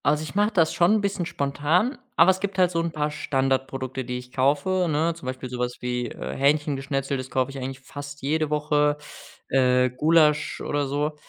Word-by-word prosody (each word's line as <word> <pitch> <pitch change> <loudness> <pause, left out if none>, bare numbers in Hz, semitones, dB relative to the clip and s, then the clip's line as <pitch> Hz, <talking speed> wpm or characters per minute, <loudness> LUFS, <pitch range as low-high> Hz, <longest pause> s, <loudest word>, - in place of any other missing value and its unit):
Also, 150 +1 +2
ich 155 - -7
mache 205 +2 +3
das 165 -6 +2
schon 175 +5 +4
'n 215 - +1
bisschen 200 -4 -1
spontan, 150 - 0 0.2
aber 170 +3 +7
es 185 - -3
gibt 195 -1 -3
halt 180 -1 +4
so 165 - 0
'n 165 0 -2
paar 150 -1 -1
Standardprodukte, 135 -2 -1
die 125 0 -4
ich 125 0 -10
kaufe, 150 +8 +1
ne? 160 +3 +1
Zum 165 -6 -11
Beispiel 130 0 -4
so 125 0 -6
was 125 0 -2
wie, 125 0 -2
äh, - - -6
Hähnchengeschnetzeltes 135 -2 0
kaufe 130 +1 0
ich 135 - -7
eigentlich 130 0 -6
fast 145 +1 -9
jede 155 +2 0
Woche 150 0 +1 0.5
äh, 125 -1 +3
Gulasch 150 +2 +3
oder 145 -1 -1
so, 145 +2 -1
145 Hz, 195 wpm, -25 LUFS, 130-160 Hz, 0.5 s, aber